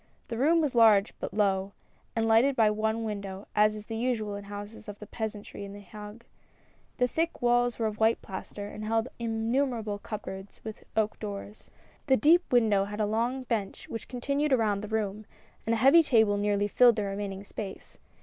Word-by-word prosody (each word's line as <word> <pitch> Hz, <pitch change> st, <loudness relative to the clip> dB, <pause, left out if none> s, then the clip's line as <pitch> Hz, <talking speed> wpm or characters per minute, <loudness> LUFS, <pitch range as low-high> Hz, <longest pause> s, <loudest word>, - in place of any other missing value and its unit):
The 230 Hz, -, -3 dB
room 325 Hz, +5 st, +4 dB
was 295 Hz, -4 st, 0 dB
large 220 Hz, -4 st, +5 dB
but -, -, -4 dB
low, 195 Hz, -2 st, +1 dB, 0.4 s
and 225 Hz, -1 st, +1 dB
lighted 235 Hz, +5 st, +4 dB
by 220 Hz, -3 st, +4 dB
one 220 Hz, +1 st, -1 dB
window, 200 Hz, -2 st, -5 dB
as 210 Hz, 0 st, +4 dB
is 210 Hz, 0 st, -9 dB
usual 225 Hz, -2 st, -1 dB
in 200 Hz, -, -5 dB
the 200 Hz, -, -14 dB
houses 205 Hz, +2 st, -8 dB
of 205 Hz, -, -7 dB
the 210 Hz, -, -10 dB
peasantry 210 Hz, -2 st, -6 dB
in 200 Hz, 0 st, -8 dB
the 205 Hz, -, -9 dB
Hague; 210 Hz, +3 st, -11 dB, 0.7 s
the 250 Hz, -, +3 dB
thick 330 Hz, +6 st, -2 dB
walls 245 Hz, 0 st, +3 dB
were 230 Hz, -, -1 dB
of 215 Hz, -1 st, -3 dB
white 225 Hz, +1 st, +3 dB
plaster, 200 Hz, +1 st, -7 dB
and 215 Hz, -, -8 dB
held 225 Hz, +3 st, 0 dB
innumerable 225 Hz, -1 st, -1 dB
cupboards 205 Hz, -2 st, -7 dB
with 220 Hz, -1 st, -8 dB
oak 215 Hz, -1 st, +1 dB
doors. 205 Hz, 0 st, -7 dB, 0.4 s
The 265 Hz, -2 st, +5 dB
deep 335 Hz, +5 st, +4 dB
window 215 Hz, -5 st, +4 dB
had 210 Hz, +1 st, -7 dB
a 215 Hz, -, +2 dB
low 235 Hz, +5 st, 0 dB
bench 225 Hz, -6 st, -3 dB
which 225 Hz, -, -6 dB
continued 280 Hz, +4 st, -1 dB
around 215 Hz, -5 st, +2 dB
the 210 Hz, -, -6 dB
room, 215 Hz, -1 st, -3 dB, 0.4 s
and 230 Hz, -, +2 dB
a -, -, -1 dB
heavy 270 Hz, +8 st, +7 dB
table 220 Hz, -9 st, +3 dB
nearly 205 Hz, 0 st, +1 dB
filled 240 Hz, +2 st, +5 dB
the 210 Hz, -, -1 dB
remaining 195 Hz, -1 st, -4 dB
space. 200 Hz, -1 st, -8 dB
220 Hz, 190 wpm, -28 LUFS, 205-235 Hz, 0.7 s, heavy